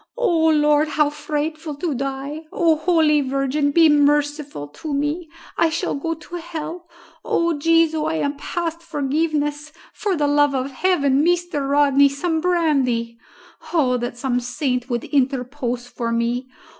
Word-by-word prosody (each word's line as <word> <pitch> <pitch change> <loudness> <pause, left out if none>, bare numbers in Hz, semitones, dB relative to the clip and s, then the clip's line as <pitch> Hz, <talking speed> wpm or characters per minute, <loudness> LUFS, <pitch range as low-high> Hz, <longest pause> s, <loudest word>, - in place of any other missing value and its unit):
O 335 -10 +2
Lord, 300 -1 +3
how 300 0 +1
frightful 305 +1 -4
to 310 +2 -2
die! 275 +4 -4
O 330 -2 +3
holy 310 -2 +3
Virgin, 275 +2 0
be 325 +3 +5
merciful 290 - +1
to 290 - -5
me. 300 +4 -2 0.3
I 335 - +4
shall 335 +3 -2
go 330 +4 -2
to 325 +3 -9
hell 340 +1 -7 0.3
O 335 -1 +1
Jesu, 325 0 +3
I 320 +1 -1
am 285 -2 -1
past 335 +2 -4
forgiveness 300 -1 -2 0.2
for 410 -3 -1
the 295 - +1
love 290 -1 +3
of 265 +1 -2
heaven, 285 -3 +2
Mr. 345 -5 0
Rodney, 280 -1 +4
some 320 +3 -1
brandy! 270 -10 +1 0.5
Oh 270 -7 +2
that 240 0 -4
some 245 -1 0
saint 250 0 -2
would 240 -2 -2
interpose 255 -2 -1
for 235 -1 -4
me! 235 +2 -1
295 Hz, 145 wpm, -21 LUFS, 275-320 Hz, 0.5 s, be